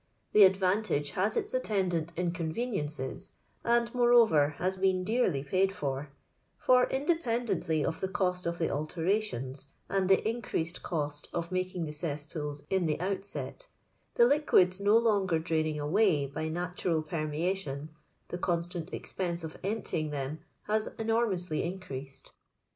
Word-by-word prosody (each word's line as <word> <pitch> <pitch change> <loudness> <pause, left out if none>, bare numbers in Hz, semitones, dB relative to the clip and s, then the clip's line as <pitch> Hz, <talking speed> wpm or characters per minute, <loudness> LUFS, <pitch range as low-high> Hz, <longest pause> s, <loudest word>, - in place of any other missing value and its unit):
The 210 -2 +9
advantage 185 -6 +1
baa 190 +3 +2
its - - -1
attendant 185 -9 0
in 175 0 0
conveniences, 165 - -3 0.3
and, 235 0 +2
moreover, 230 - +5
has 185 +1 -1
%8en 185 -1 +1
dearly 200 - +1
paid 190 +7 +2
for; 140 -4 -3 0.5
for, 250 0 +4
independently 235 - 0
of 160 - -2
the 190 - -1
cost 180 -2 -1
of 170 0 -2
the 165 - 0
alterations 155 - -2 0.2
and 195 -1 +1
the 195 +2 +4
increased 220 -7 -2
cost 145 -3 -3
of 170 0 -3
maldag 185 -2 -1
the 150 - -5
cesspools 150 -1 -4
in 190 -3 +2
the 150 - 0
outset 200 - -4 0.2
— - - -42
the 235 - +7
liquids 235 - +4
no 205 +3 +5
lonjser 195 -8 +2
draining 155 -2 0
away 150 0 +3
by 150 +3 -4
natural 175 -1 -1
permeation 155 -1 -2 0.2
— - - -42
the 175 - -4
constant 175 0 -2
expense 175 -2 -3
of 160 -1 -6
emptying 185 -6 -2
them 145 +1 -3 0.2
has 215 +1 0
enormously 220 -8 0
increased. 140 -7 -6
180 Hz, 140 wpm, -30 LUFS, 155-200 Hz, 0.5 s, The